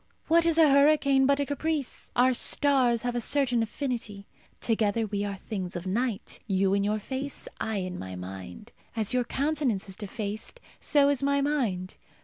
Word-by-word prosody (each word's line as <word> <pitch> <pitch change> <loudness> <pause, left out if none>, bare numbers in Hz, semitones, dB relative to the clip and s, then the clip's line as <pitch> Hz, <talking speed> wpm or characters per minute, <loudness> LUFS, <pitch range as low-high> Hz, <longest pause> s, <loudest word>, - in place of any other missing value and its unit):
What 335 +1 +4
is 330 -1 +2
a 320 -2 +7
hurricane 280 -1 +4
but 280 0 +3
a 285 - +1
caprice? 290 0 -3
Our 255 +1 +4
stars 255 -3 +3
have 245 0 -1
a 240 - -1
certain 250 -2 +2
affinity. 225 -4 -4 0.3
Together 225 -1 +1
we 205 -1 -2
are 200 -1 -3
things 190 -2 -5
of 175 +1 -5
night 220 +2 -2
you 195 -1 +2
in 200 0 +2
your 210 +1 0
face, 265 +6 -4
I 220 - -2
in 185 -2 -3
my 95 0 -6
mind. 95 - -9 0.2
As 220 -1 -1
your 250 -1 +2
countenance 275 -8 0
is 190 - -5
defaced, 215 - -5 0.2
so 285 -1 +3
is 285 -2 +1
my 280 0 +2
mind. 230 -11 -1
235 Hz, 175 wpm, -27 LUFS, 200-280 Hz, 0.3 s, a